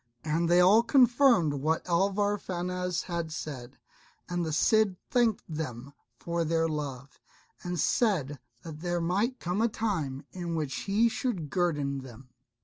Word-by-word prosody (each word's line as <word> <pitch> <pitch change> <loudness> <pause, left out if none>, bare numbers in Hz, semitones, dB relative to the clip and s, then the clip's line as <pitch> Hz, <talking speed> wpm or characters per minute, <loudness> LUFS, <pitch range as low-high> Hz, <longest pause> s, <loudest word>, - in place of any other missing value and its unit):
And 165 +2 0
they 175 +1 +5
all 195 +5 +6
confirmed 240 - +4
what 155 +5 -1
Alvar 200 +4 +1
Fanez 180 -1 -3
had 170 -3 -4
said; 135 -5 -7 0.5
and 175 -1 -2
the 160 - -2
Cid 210 +5 +3 0.2
thanked 235 -4 +2
them 140 -4 -6 0.2
for 170 +3 -2
their 165 0 +1
love, 140 -4 -5 0.4
and 175 -1 -4
said 150 - +1 0.2
that 155 -2 -8
there 175 +1 -1
might 200 +10 0
come 180 +4 -1
a 230 - +4
time 165 - -3
in 175 -2 -4
which 150 -3 -2
he 215 +4 +4
should 200 - -3
guerdon 145 -6 0
them. 130 0 -12
170 Hz, 145 wpm, -29 LUFS, 150-200 Hz, 0.5 s, all